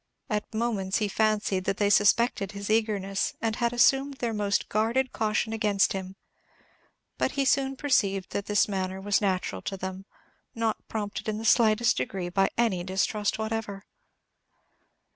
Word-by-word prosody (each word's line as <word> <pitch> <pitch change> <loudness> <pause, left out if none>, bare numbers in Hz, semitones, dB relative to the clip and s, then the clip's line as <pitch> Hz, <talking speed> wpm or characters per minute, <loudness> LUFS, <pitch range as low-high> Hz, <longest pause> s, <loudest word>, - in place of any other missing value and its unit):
At 210 0 -2
moments 215 -4 -1
he 215 - 0
fancied 210 -2 0
that 195 - -1
they 205 -1 +2
suspected 205 -1 +3
his 200 +1 -4
eagerness, 205 -3 0
and 225 -1 -1
had 235 -1 +1
assumed 270 +3 +3
their 235 -3 -2
most 205 -1 0
guarded 230 +5 0
caution 220 +1 0
against 210 -3 +2
him; 190 0 -6 1.0
but - - 0
he 275 -1 0
soon 270 0 +2
perceived 200 -10 0
that 200 - -3
this 205 0 +3
manner 190 -2 -3
was 200 +1 +1
natural 185 - -1
to 195 - -5
them, 190 +1 -6 0.5
not 225 -1 -2
prompted 210 0 -4
in 215 - -2
the 225 - -6
slightest 225 0 +4
degree 175 +8 -3
by 195 +2 +2
any 220 -7 +1
distrust 195 +3 -1
whatever. 220 -2 -4
210 Hz, 155 wpm, -27 LUFS, 195-225 Hz, 1.0 s, slightest